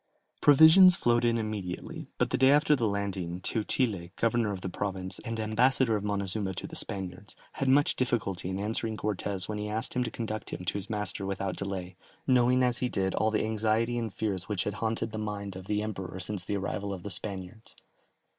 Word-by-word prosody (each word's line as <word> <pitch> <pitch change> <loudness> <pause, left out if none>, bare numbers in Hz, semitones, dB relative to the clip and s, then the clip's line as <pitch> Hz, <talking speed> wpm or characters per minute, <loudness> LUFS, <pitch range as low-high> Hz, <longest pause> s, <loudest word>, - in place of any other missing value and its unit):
Provisions 160 +6 +8
flowed 120 -4 +2
in 115 -1 +3
immediately, 105 -5 -5
but - - 0
the - - +2
day 130 0 +6
after 150 +1 +5
the 120 -5 0
landing, 95 -4 -2
Teutile, 105 -3 -1
governor 115 -2 +1
of 95 -2 -5
the - - -4
province, 95 0 -4
and 115 0 -5
ambassador 115 +2 +3
of 105 - -2
Montezuma 100 -1 -1
to - - -4
the - - -8
Spaniards, 95 0 -3 0.2
had 135 - -1
much 145 +2 +4
difficulty 100 -8 -1
in 95 - -2
answering 110 +2 -2
Cortès 100 -2 -2
when 105 -1 -3
he 105 0 -3
asked 110 +3 -2
him 125 - +1
to 120 - -3
conduct 110 -2 -4
him 90 - -6
to - - 0
his 100 +1 -5
master 105 -2 -1
without 95 0 -2
delay, 95 -2 -4 0.3
knowing 125 0 +4
as 125 -1 +1
he 125 - 0
did 95 -3 -1
all 110 - +2
the 110 0 0
anxiety 110 +2 +1
and 115 -3 -3
fears 95 -3 -3
which 100 -3 0
had 105 - -2
haunted 115 +1 -2
the 110 - -4
mind 100 -2 -4
of 95 0 -9
the 105 0 0
Emperor 95 -4 -5
since 95 -1 -2
the 100 - -1
arrival 100 +1 -3
of 90 - -11
the 105 - -4
Spaniards. 95 +2 -5
105 Hz, 205 wpm, -29 LUFS, 95-115 Hz, 0.3 s, Provisions